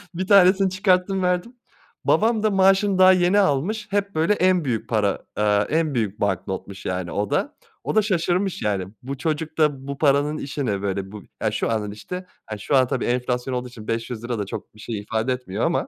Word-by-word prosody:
1 185 +1 -3
tanesini 195 -1 +6
çıkarttım, 185 0 +1
verdim. 180 +7 -1 0.5
Babam 220 -1 +2
da 215 - +4
maaşını 195 +1 +3
daha 185 0 +8
yeni 185 +2 +3
almış, 200 +5 0
hep 200 -2 -1
böyle 165 +6 +3
en 185 -4 +2
büyük 115 -4 -2
para, 105 -4 0
aaa, 105 0 +2
en 155 -2 +1
büyük 105 -3 -1
banknotmuş 95 0 -3
yani 90 -2 -3
o 105 0 -2
da. - - -1 0.3
O - - -3
da 215 - +6
şaşırmış 185 -1 0
yani, 100 -3 -1 0.2
bu 135 +1 -5
çocuk 155 +1 -3
da 145 -3 +1
bu 140 - -4
paranın 145 +1 +2
işi 140 -1 -4
ne 100 -3 -1
böyle, 95 -1 -3
bu 105 -1 -9 0.2
ya 110 - +1
şu 110 - -1
andan 105 -2 -2
işte, 110 - -7 0.2
hani, 110 -1 -6
şu 140 - 0
an 130 -2 +5
tabii - - -2
enflasyon 125 +1 -1
olduğu 125 0 -3
için 115 -3 -12
500₺ 115 0 -3
da 100 - -2
çok 100 - -8
bir 110 - -17
şey 110 -1 -5
ifade 110 +4 -1
etmiyor 115 - -3
ama 170 - 0
140 Hz, 205 wpm, -23 LUFS, -, 0.5 s, daha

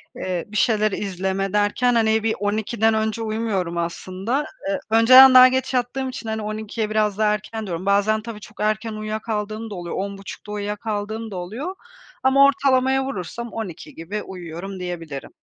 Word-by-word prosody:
Eee, 180 -2 -3
bir 210 +1 -5
şeyler 215 -2 +2
izleme 195 0 -2
derken, 210 +4 +2
hani, 220 -1 +2
bir 225 - +1
12’den 220 +2 +1
önce 220 +1 -1
uyumuyorum 215 -6 -2
aslında. 185 - -2 0.2
Iıı, 195 - 0
önceden 255 +4 +8
daha 255 0 +10
geç 260 +1 -1
yattığım 255 +2 -1
için, 230 -3 -6
hani, 220 0 -2
12'ye 215 +1 -3
biraz 215 -2 +1
daha 210 -1 +3
erken 215 +1 -5
diyorum. 175 +1 -4
Bazen 205 +2 +2
tabii 225 -1 -8
çok 215 +1 -15
erken 215 +1 0
uyuyakaldığım 215 0 -4
da 205 - -6
oluyor, 175 -1 -5
10.30 195 0 -5
uyuyakaldığım 210 +1 -4
da - - -6
oluyor 230 - -5 0.5
ama 275 +1 +6
ortalamaya 265 -1 +3
vurursam 235 +1 -5
12 185 -7 -7
gibi 195 +6 -5
uyuyorum 185 +1 -7
diyebilirim. 165 -6 -6
215 Hz, 160 wpm, -22 LUFS, 195-225 Hz, 0.5 s, daha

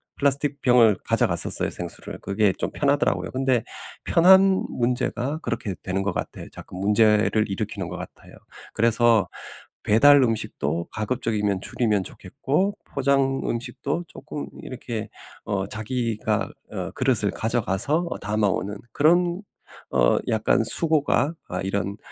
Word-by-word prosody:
플라스틱 140 0 +1
병을 120 -5 +5
가져갔었어요, - - +1
생수를. - - -7
그게 100 0 +1
좀 - - -3
편하더라고요. 140 -10 0
근데 130 -3 +1 0.4
편한 190 +2 +5
문제가 125 +3 -1
그렇게 110 -5 -3
되는 95 +1 -1
것 100 +1 -1
같아요. - - -6
자꾸 - - -11
문제를 105 +1 +3
일으키는 95 - -4
것 - - -6
같아요. - - -11 0.4
그래서 115 -2 +3 0.5
배달 140 +7 +6
음식도 105 - -1
가급적이면 105 -4 -1
줄이면 105 -4 0
좋겠고 140 - -2
포장 135 -1 +1
음식도 140 +7 -3
쪼끔 145 - -7 0.2
이렇게 120 -4 -6 0.4
어 100 -2 -1
자기가 110 +1 -2 0.2
어 - - -4
그릇을 120 -6 +1
가져가서 115 +4 0
어 - - -4
담아 105 +1 0
오는 100 +1 -2
그런 175 - +2 0.5
어 - - +3
약간 110 +1 +2
수고가 145 0 +3
아 90 - -4
이런 100 +1 -2
115 Hz, 300 characters per minute, -24 LUFS, 105-140 Hz, 0.5 s, 배달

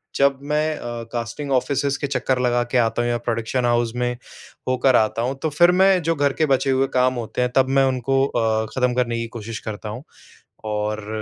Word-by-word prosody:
जब 140 -1 +2
मैं 155 +1 +1
अ, 120 -1 -6
casting 120 +4 -4
offices 140 +2 0
के 140 - -1
चक्कर 130 -2 0
लगा 120 -1 +2
के - - +2
आता 115 0 +1
हूँ 120 - 0
या 120 - +1
प्रोडक्शन 115 +2 -1
हाउस 120 -1 +1
में 125 0 0 0.6
होकर 130 0 +3
आता 110 0 +2
हूँ। 125 +3 -1
तो 160 - 0
फ़िर 175 +4 +4
मैं 190 -2 +4
जो 165 0 0
घर 145 -2 +1
के - - +5
बचे 135 - -2
हुए 135 +1 +2
काम 130 0 +3
होते 115 - -4
हैं 125 0 0
तब 130 -1 +3
मैं - - +5
उनको 135 +1 +1
अ, 110 -4 0
खत्म 125 -1 +1
करने 120 -1 0
की 115 - -4
कोशिश 110 0 -6
करता 105 0 -6
हूँ 120 +5 -7 0.6
और 105 0 -3
125 Hz, 215 wpm, -22 LUFS, 115-135 Hz, 0.6 s, के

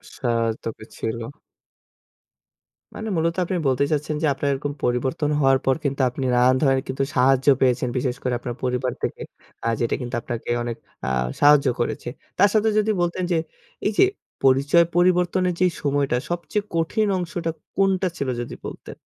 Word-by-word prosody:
সা 125 - -4 0.4
তোকে 110 -1 -6
ছিল। 115 +1 -3 1.8
মানে 220 0 -4
মূলত 165 +1 +1
আপনি 185 - -1
বলতে 130 +1 +2
চাচ্ছেন 150 0 -1
যে, - - +2
আপনার 140 +1 -2
এরকম 145 +1 -3
পরিবর্তন 130 +5 0
হওয়ার 135 -1 +4
পর 135 - +3
কিন্তু 140 -1 -1
আপনি 130 +2 -4
নানান 125 +1 +5
ধরনের 135 -3 +3
কিন্তু 130 +1 -1
সাহায্য 130 +1 +3
পেয়েছেন। 125 -1 +2
বিশেষ 125 -1 -1
করে 125 - 0
আপনার 120 -1 -5
পরিবার 125 0 0
থেকে - - -3 0.4
আ - - +1
যেটা 120 - +1
কিন্তু 120 -1 -4
আপনাকে 120 -1 -5
অনেক 120 -1 -4 0.3
আ - - -3 0.3
সাহায্য 145 -1 +6
করেছে। 120 - -2 0.3
তার 200 - +6
সাথে 220 0 +3
যদি 215 +1 +3
বলতেন 175 +1 -1
যে, 170 - +3 0.5
এই 205 - +3
যে - - +8 0.4
পরিচয় 140 +6 +5
পরিবর্তনের 180 +1 +3
যে 185 - +4 0.2
সময়টা 140 -3 +1
সবচেয়ে 175 +4 -2
কঠিন 185 +7 +1
অংশটা 170 -2 -3 0.2
কোনটা 195 -1 +2
ছিল 140 - -2
যদি 120 - -6
বলতেন? - - -8
140 Hz, 165 wpm, -23 LUFS, 125-175 Hz, 1.8 s, যে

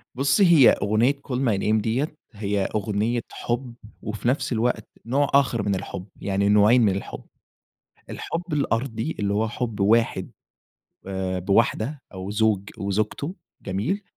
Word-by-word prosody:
بصي 140 +8 +3
هي 165 -8 +7
أغنية 110 +6 +2
Call 125 - -2
my 120 -6 +1
name 110 0 +2
دِيَّة 130 +8 -1 0.2
هي 100 -1 -1
أغنية 110 +3 0
حب، 120 +1 -3 0.3
وفي 110 +2 -4
نفس 130 +1 0
الوقت 115 -1 0 0.2
نوع 140 +4 +2
آخر 130 -5 +3
من 100 -1 0
الحب 90 -1 -6 0.2
يعني 100 0 +1
نوعين 105 +4 +5
من 100 -4 +3
الحب، 100 - -6 0.9
الحب 175 0 -5
الأرضي 125 -1 -1
اللي 100 -1 0
هو 110 +2 +1
حب 115 -2 -4
واحد 115 +4 +2 0.8
آآ، 95 -1 -2
بواحدة 110 - +1
أو 95 +1 -6
زوج 105 -2 +1
وزوجته 110 - -2 0.3
جميل؟ 110 - -2
110 Hz, 140 wpm, -24 LUFS, 100-130 Hz, 0.9 s, هي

